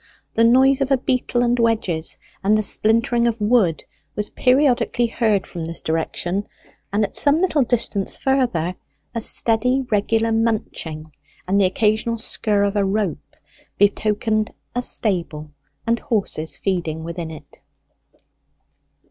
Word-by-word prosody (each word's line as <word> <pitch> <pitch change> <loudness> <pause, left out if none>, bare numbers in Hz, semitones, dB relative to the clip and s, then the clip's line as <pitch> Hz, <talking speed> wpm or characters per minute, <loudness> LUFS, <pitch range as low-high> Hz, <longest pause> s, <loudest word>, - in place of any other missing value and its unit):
The 230 - +2
noise 265 +4 +4
of 275 - 0
a 270 - +3
beetle 250 -1 0
and 240 0 +1
wedges 215 -8 0 0.3
and 210 +2 +3
the 215 - 0
splintering 230 +3 +3
of 230 -1 -1
wood 210 -6 +2 0.3
was 210 0 -2
periodically 255 -2 +2
heard 220 -4 0
from 170 - -7
this 165 +1 -4
direction; 175 +4 -2 0.4
and 205 +2 +1
at 200 - -3
some 290 +2 +4
little 350 -5 +2
distance 225 -5 +1
further 240 -11 0 0.4
a 230 - -3
steady 245 +4 +2
regular 225 +2 +1
munching 210 -9 -2 0.4
and 200 +2 +2
the - - +4
occasional 215 +4 +1
scurr 210 -2 0
of 200 0 0
a 205 - +2
rope 195 -4 -2 0.4
betokened 215 +1 +1 0.2
a 245 - -1
stable, 170 -10 -1 0.3
and 230 0 +1
horses 200 - -2
feeding 170 -5 -2
within 170 0 -5
it. 155 -2 -13
215 Hz, 135 wpm, -21 LUFS, 190-240 Hz, 0.4 s, noise